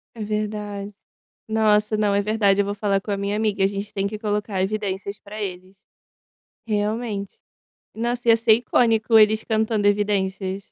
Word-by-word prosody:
É 220 - -5
verdade. 210 -1 -4 0.5
Nossa, 215 -1 +2
não, 205 -1 +1
é 200 - +3
verdade, 205 -2 +2
eu - - -1
vou 205 0 -3
falar 200 -1 0
com 205 - -5
a 200 - 0
minha 200 +1 -2
amiga, 210 -2 0
a - - +5
gente 200 +1 -6
tem 195 0 -1
que 210 +1 -6
colocar 210 -2 -2
evidências 200 0 -3
para 210 +1 -9
eles. 190 0 -7 0.8
Realmente. 210 -1 -2 0.6
Nossa, 240 +1 -2
ia 225 - +7
ser 225 -1 +5
icônico 225 -1 +3
eles 215 0 +4
cantando 220 -1 0
evidências. 195 -2 0
210 Hz, 160 wpm, -23 LUFS, 200-220 Hz, 0.8 s, ia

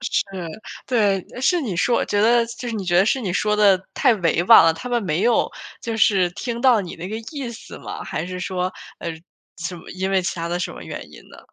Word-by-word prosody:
是， - - 0 0.6
对， 210 -6 +2 0.2
呃， 250 - -6
是 345 +7 +3
你 215 - -3
说 235 +7 +2
我 - - +1
觉 205 - 0
得 235 +1 +4
就 235 +1 -7
是 230 - -3
你 205 -3 -3
觉 175 -1 +1
得 190 - +6
是 260 +5 +1
你 195 -7 -2
说 210 +3 +1
得 205 -2 +6 0.2
太 235 - +4
委 170 -3 +1
婉 205 -3 +9
了， 165 - +5
他 250 +10 -7
们 240 -2 0
没 175 -1 -1
有 240 +2 +3 0.3
就 230 -1 -3
是 195 -5 +3
听 235 +4 -4
到 245 -4 +5
你 180 -3 -7
那 175 +3 -6
个 215 - -4 0.2
意 275 -5 -4
思 235 - -11
吗？ - - -7
还 - - -3
是 185 0 -5
说， 185 0 -2 0.3
呃， 170 - -3 0.5
什 175 +1 -4
么 170 - -12
因 190 +1 -3
为 190 -1 +2
其 180 - -2
他 170 0 -3
的 175 +1 -1
什 - - -3
么 - - -10
原 - - -8
因 - - -12
呢？ - - -14
205 Hz, 270 characters per minute, -22 LUFS, 180-235 Hz, 0.6 s, 婉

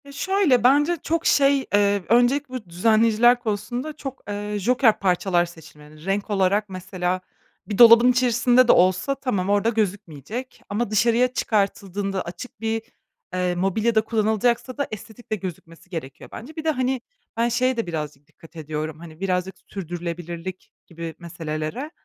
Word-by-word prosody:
Ya, 280 - -12
şöyle, 345 - +2
bence 295 +7 +4
çok 330 +1 -1
şey, 275 -1 +4
eee, 200 -1 +3
öncelikle 245 +5 +3
bu 245 -5 -6
düzenleyiciler 225 +6 +4
konusunda 240 +6 -3
çok, 270 -1 -7
eee, 205 0 -4
joker 240 +2 +3
parçalar 180 -2 +2
seçilmeli. 155 -2 -15
Renk 200 +2 -1
olarak 200 +1 +1
mesela 185 -1 -3 0.5
bir 205 - -3
dolabın 235 +1 +8
içerisinde 245 0 +3
de - - +7
olsa 185 +9 +3
tamam 205 -9 -2
orada 205 +2 +3
gözükmeyecek 205 - -4
ama 210 +2 -1
dışarıya 235 +4 +3
çıkartıldığında 200 -3 -1
açık 195 +6 -9
bir, 225 0 -1 0.5
eee, 180 -1 0
mobilyada 215 +5 +1
kullanılacaksa 225 +3 0
da 285 - -1
estetik 220 +2 -10
de - - +2
gözükmesi 180 -3 -9
gerekiyor 155 -7 -7
bence. 290 +7 -9
Bir 315 - -5
de, 320 - +1
hani, 260 -2 -1 0.4
ben 235 +1 +2
şeye 255 +1 +1
de 230 - -2
birazcık 150 -4 -5
dikkat 165 +1 -18
ediyorum, 155 0 -5
hani, 165 -1 -12
birazcık 185 0 -1
sürdürülebilirlik 175 0 -6 0.2
gibi 165 -1 -7
meselelere. 170 - -5
205 Hz, 145 wpm, -23 LUFS, 180-245 Hz, 0.5 s, dolabın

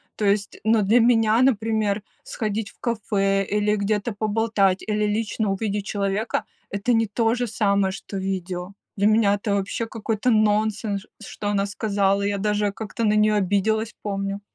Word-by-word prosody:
то 210 - -2
есть 200 0 0
ну 220 0 +3
для 220 +5 +4
меня, 225 -1 +4
например, 220 -4 +1 0.2
сходить 215 -1 -3
в - - -30
кафе, 195 -4 0
или 210 +1 +1
где-то 210 +2 -1
поболтать, 205 -2 +1
или 210 0 +1
лично 210 0 -1
увидеть 205 0 -2
человека- 200 +2 -1 0.3
это 200 +5 0
не 225 0 +3
то 225 +3 +1
же 245 0 -1
самое, 200 -3 +1
что 195 +1 -7
видео. 190 -1 -4 0.2
Для 200 +1 +3
меня 215 -2 +4
это 205 0 -1
вообще 200 +3 -2
какой-то 225 +1 -2
нонсенс, 215 -1 +1 0.2
что 205 - -6
она 200 -1 +1
сказала! 200 -1 0
Я 200 0 0
даже 210 0 0
как-то 220 +2 -5
на 210 - +3
нее 215 0 +3
обиделась, 210 +3 0
помню. 195 -1 -3
210 Hz, 160 wpm, -23 LUFS, 200-220 Hz, 0.3 s, для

